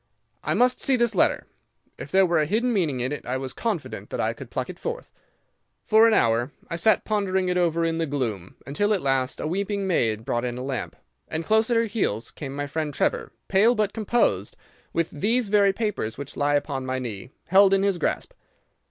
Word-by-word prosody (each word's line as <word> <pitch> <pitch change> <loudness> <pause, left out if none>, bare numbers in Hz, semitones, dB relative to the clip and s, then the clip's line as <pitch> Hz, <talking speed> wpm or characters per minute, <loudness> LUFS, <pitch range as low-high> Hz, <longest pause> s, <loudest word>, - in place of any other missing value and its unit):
I - - 0
must 250 +3 +3
see 270 - +2
this 235 -2 +1
letter. - - +2 0.5
If - - -7
there 190 0 +4
were 170 -2 +2
a 150 - +1
hidden 235 +6 +1
meaning 155 - 0
in 125 +3 -1
it, 150 - -4
I 125 +2 -2
was 130 -1 -5
confident 210 -9 -4
that - - -4
I - - 0
could - - -10
pluck - - -3
it - - -9
forth. 480 +1 -5 0.7
For 220 +1 +6
an 225 - +3
hour 115 +2 +2 0.2
I - - -1
sat 215 +6 +3
pondering 190 -4 0
over 170 -2 +1
it - - +2
in 165 0 -2
the 165 - 0
gloom, 115 -10 -3
until 205 - +1
at 190 - -3
last 135 -1 0
a - - -3
weeping 200 +4 -1
maid 115 - 0
brought 120 -3 -1
in 125 -1 -3
a 125 - -5
lamp, 135 -1 -4 0.3
and 160 +1 -3
close 220 +5 +2
at 235 - +3
her 230 - +3
heels 200 - -2
came 140 -2 -7
my 145 0 -2
friend 150 0 -3
Trevor, - - 0 0.2
pale 215 +6 +4
but 210 -2 0
composed, 225 +2 0 0.3
with 165 -1 -1
these 220 +8 0
very 200 -1 +4
papers 195 - -3
which 140 0 -7
lie 145 0 +1
upon 140 -2 -1
my 130 0 -2
knee 115 -4 -6 0.2
held 195 +2 +6
in 195 0 +3
his 195 -3 +1
grasp. - - -2
170 Hz, 215 wpm, -25 LUFS, 135-210 Hz, 0.7 s, For